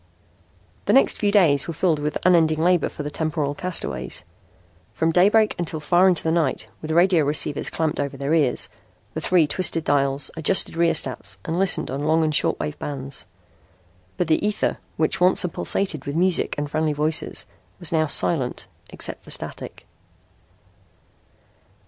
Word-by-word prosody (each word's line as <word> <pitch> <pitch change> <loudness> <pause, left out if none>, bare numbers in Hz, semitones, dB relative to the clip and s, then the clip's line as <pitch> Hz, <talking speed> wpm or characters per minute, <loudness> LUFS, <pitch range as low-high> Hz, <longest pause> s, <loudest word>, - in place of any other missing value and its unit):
The - - +2
next 270 - +4
few 205 -1 +1
days 165 -9 +3
were 170 - -5
filled 165 -2 +1
with 150 +1 -2
unending 165 -3 +4
labor 175 +1 +2
for 150 - -8
the 145 - -5
temporal 150 -3 -2
castaways. 180 +4 -3 0.7
From 160 0 +1
daybreak 210 +5 +3
until 165 -2 -2
far 175 +5 +3
into 180 -3 +3
the 160 - 0
night, 160 -5 -1
with 155 - -7
radio 170 0 +3
receivers 145 0 +1
clamped 160 -1 -2
over 140 -1 -3
their 140 +3 -2
ears, 150 -6 +1 0.5
the - - -4
three 180 -3 +3
twisted 165 +2 0
dials, 140 -1 0
adjusted 165 +4 +3
rheostats 130 - 0
and 165 +2 -2
listened 180 -7 +1
in 135 +2 -4
on 150 - -2
long 160 +1 +2
and 155 -1 0
short - - 0
wave 150 0 -5
bands. 135 -2 -6 0.9
But 180 - -1
the 160 +3 +1
ether, 210 0 -1 0.2
which 160 +4 0
once 180 +1 +4
had 180 - -4
pulsated 170 -8 -1
with 140 - -4
music 180 +1 +1
and 145 0 -2
friendly 155 +1 -1
voices, 150 +2 0 0.5
now 160 -1 +2
was 145 - -3
silent, 135 -8 +2 0.3
except - - -4
for - - -15
static. - - -4
160 Hz, 165 wpm, -22 LUFS, 145-175 Hz, 0.9 s, next